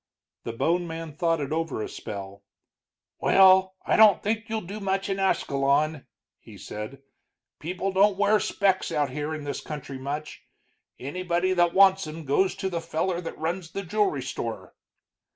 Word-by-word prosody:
The 115 - -4
bone 175 +8 0
man 165 -1 -6
thought 165 +1 0
it 140 -1 -4
over 160 -5 -2
a - - -4
spell. 100 0 -8 0.8
"Well, 190 0 +5
I - - +2
don't 215 -3 +6
think 220 +2 -2
you'll 220 0 -2
do 200 +4 -7
much 195 0 -1
in 195 0 -1
Ascalon," 145 -4 +1 0.3
he - - -14
said. 110 +6 -8 0.6
"People 180 +4 -3
don't 195 +1 +3
wear 205 +1 +3
specs 195 -2 0
out 145 -3 0
here 150 +3 -3
in 155 - -7
this 145 -1 -4
country 140 -3 -7
much. 145 +3 -5 0.6
Anybody 175 +6 -1
that 175 -1 +2
wants 190 -2 +5
'em 155 +1 -8
goes 185 +8 +2
to 195 - -3
the 170 -3 -3
feller 170 +2 -2
that 165 - -7
runs 165 +2 -3
the 195 +4 -5
jewelry 185 -7 0
store." 110 -5 -5
170 Hz, 165 wpm, -26 LUFS, 145-190 Hz, 0.8 s, don't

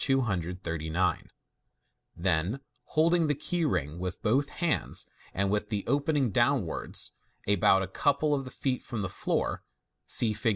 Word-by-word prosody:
239 90 - 0 0.9
Then, 90 +6 +1 0.3
holding 165 +1 +3
the 145 - +1
key 170 +4 -1
ring 85 - -1
with 90 -1 -4
both 135 +6 +2
hands, 170 -3 0 0.3
and 100 +1 0
with 105 0 0
the 105 -3 -1
open 145 +4 +1
ing 130 -6 +2
downwards, 120 - 0 0.4
about 95 -1 +4
a - - -3
couple 145 +8 +1
of 135 -2 -2
feet 130 -2 -1
from 110 -4 -4
the 95 - -2
floor - - -1 0.5
(see 110 -2 +4
Fig. 105 +3 +1
110 Hz, 140 wpm, -29 LUFS, 90-140 Hz, 0.9 s, about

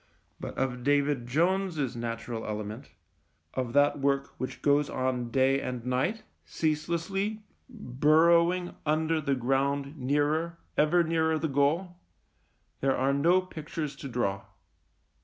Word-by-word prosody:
But - - -7
of 125 -2 -2
David 140 -2 +1
Jones's 165 -1 0
natural 115 -1 -4
element, 110 +4 -5 0.6
of 125 -3 -3
that 145 +1 +3
work 140 0 0
which 130 - -5
goes 145 0 +3
on 130 -2 -1
day 135 +2 +2
and 125 -2 -5
night, 130 - -1 0.2
cease 155 -1 -1
lessly, 195 +6 -2 0.3
burrowing 170 - +3
under 155 +1 +1
the 140 -2 0
ground 135 +3 0
nearer, 150 +5 0 0.2
ever 160 +3 +4
nearer, 160 -1 +1
the 160 +1 -1
goal, 155 +6 0 0.8
there 135 0 +1
are 135 +2 +2
no 170 +6 +4
pictures 155 -4 -6
to 140 - -7
draw. 100 -5 -2
145 Hz, 125 wpm, -28 LUFS, 130-165 Hz, 0.8 s, ever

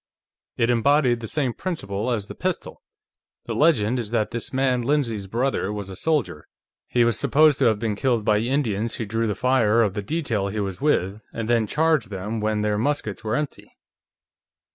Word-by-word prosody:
It 115 +1 +2
embodied 125 0 +3
the 115 - -6
same 130 -1 -1
principle 115 - -3
as 110 -5 -1
the - - -9
pistol. - - -4 0.6
The - - -3
legend 125 -6 +2
is 115 -3 -4
that 110 -2 0
this 115 - -1
man 130 -2 +1
Lindsay's 120 -7 -1
brother 115 -1 -1
was 100 -2 -5
a - - -7
soldier; 140 - -1 0.4
he 120 - +2
was 115 -3 +2
supposed 155 -1 +4
to - - +3
have 110 -2 +3
been 110 -1 -2
killed 120 -2 0
by 105 0 +3
Indians 115 -3 -1
who 115 - -3
drew 115 +2 -1
the 105 - -1
fire 115 -2 +3
of 100 -4 0
the 105 - -3
detail 115 -6 -2
he 105 +2 -3
was 95 -3 -4
with 105 -8 +1
and 115 -1 -4
then 115 -2 +2
charged 155 -4 +1
them 105 +3 -4
when 105 0 0
their 105 0 0
muskets 120 -5 -2
were 110 +1 -1
empty." 150 -1 -4
115 Hz, 190 wpm, -23 LUFS, 105-130 Hz, 0.6 s, supposed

